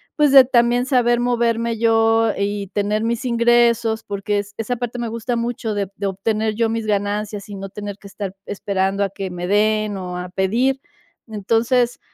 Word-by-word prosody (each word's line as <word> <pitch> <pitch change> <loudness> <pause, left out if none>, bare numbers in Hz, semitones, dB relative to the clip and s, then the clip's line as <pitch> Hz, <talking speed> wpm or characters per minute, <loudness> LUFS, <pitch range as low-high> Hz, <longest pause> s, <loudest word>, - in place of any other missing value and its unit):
pues, 295 -2 +3
de 270 -1 +9
también 245 0 +2
saber 240 -3 +2
moverme 235 -1 0
yo 225 0 +3
y 200 0 -2
tener 210 +2 -1
mis 235 +2 -2
ingresos, 235 -2 +2
porque, 205 0 -2
es 205 0 -7
esa 225 +2 -2
parte 245 0 -4
me 235 - -2
gusta 230 +2 -3
mucho 235 -2 -2
de 200 -2 -2
de 200 - -2
obtener 215 +3 -1
yo 230 0 +1
mis 225 0 -2
ganancias 205 0 -2
y 205 - -7
no 195 0 -6
tener 205 0 -7
que 200 - -13
estar 195 -1 -6
esperando 195 0 -1
a 195 - -1
que 195 0 -5
me 180 0 -5
den, 215 +1 +1
o 180 -1 -5
a 180 0 -5
pedir. 230 +9 0 0.5
Entonces, 230 +3 +1
220 Hz, 185 wpm, -20 LUFS, 200-235 Hz, 0.5 s, de